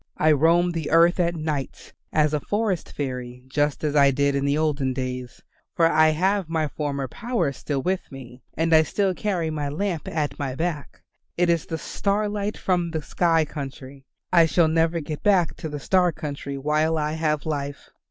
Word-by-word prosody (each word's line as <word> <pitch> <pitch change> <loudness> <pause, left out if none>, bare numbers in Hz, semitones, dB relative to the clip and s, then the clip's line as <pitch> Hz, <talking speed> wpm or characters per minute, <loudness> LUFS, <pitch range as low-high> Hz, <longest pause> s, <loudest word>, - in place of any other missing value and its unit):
I 155 - +4
roam 165 +4 +4
the 165 -3 -3
earth 170 +3 +4
at 170 -1 +1
nights 155 -4 -4 0.2
as 155 -1 +2
a 150 - +1
forest 205 +1 -2
fairy 125 -3 -5
just 145 +3 0
as 150 -1 0
I 140 -1 +6
did 140 +1 +1
in 140 0 0
the 140 +1 +1
olden 145 -4 0
days, 125 -1 -5 0.3
for 165 - +4
I 155 -1 +5
have 185 +3 +1
my 160 -2 0
former 140 -2 -3
power 230 - -1
still 135 0 -3
with 185 0 -2
me, 130 -2 -11 0.2
and 165 +1 +1
I 160 - +8
still 190 +5 0
carry 180 -5 -1
my 150 -2 -2
lamp 170 +1 -3
at 150 -2 -2
my 135 -3 -3
back; 160 -1 -4 0.4
it 175 0 +3
is 170 -2 0
the 160 - -3
starlight 205 +3 -2
from 175 -2 0
the 160 -2 -3
sky 165 -1 +2
country. 135 -2 -8 0.3
I 170 -2 +6
shall 160 +2 +3
never 165 +1 +1
get 150 0 -6
back 190 -5 +3
to 160 - -5
the 145 -1 -5
star 180 +3 +2
country 140 -2 -6
while 155 +3 +1
I 150 0 -1
have 155 -2 -1
life. 145 -2 -4
155 Hz, 190 wpm, -24 LUFS, 140-170 Hz, 0.4 s, I